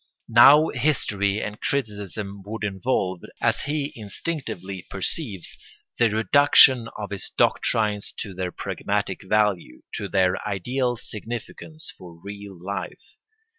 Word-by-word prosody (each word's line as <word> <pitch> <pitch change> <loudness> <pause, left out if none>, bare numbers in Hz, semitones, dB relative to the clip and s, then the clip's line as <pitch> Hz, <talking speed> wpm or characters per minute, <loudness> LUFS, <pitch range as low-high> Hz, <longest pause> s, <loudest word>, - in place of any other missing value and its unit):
Now 140 +7 +8
history 105 -7 0
and 105 0 -6
criticism 105 -5 -3
would 110 +1 -5
involve, 95 -3 -1 0.2
as - - +2
he 145 0 -2
instinctively 100 - -5
perceives, 100 - -3 0.4
the 120 -1 +5
reduction 120 +2 +6
of 105 -1 -6
his 100 - -4
doctrines 105 -2 +1
to 100 - -5
their 90 0 -3
pragmatic 100 0 -2
value, 100 -10 0
to 100 - -4
their 95 0 +2
ideal 120 +6 -1
significance 120 +10 -7
for 85 -2 -13
real 100 0 -9
life. 95 +2 -6
105 Hz, 115 wpm, -24 LUFS, 95-120 Hz, 0.4 s, Now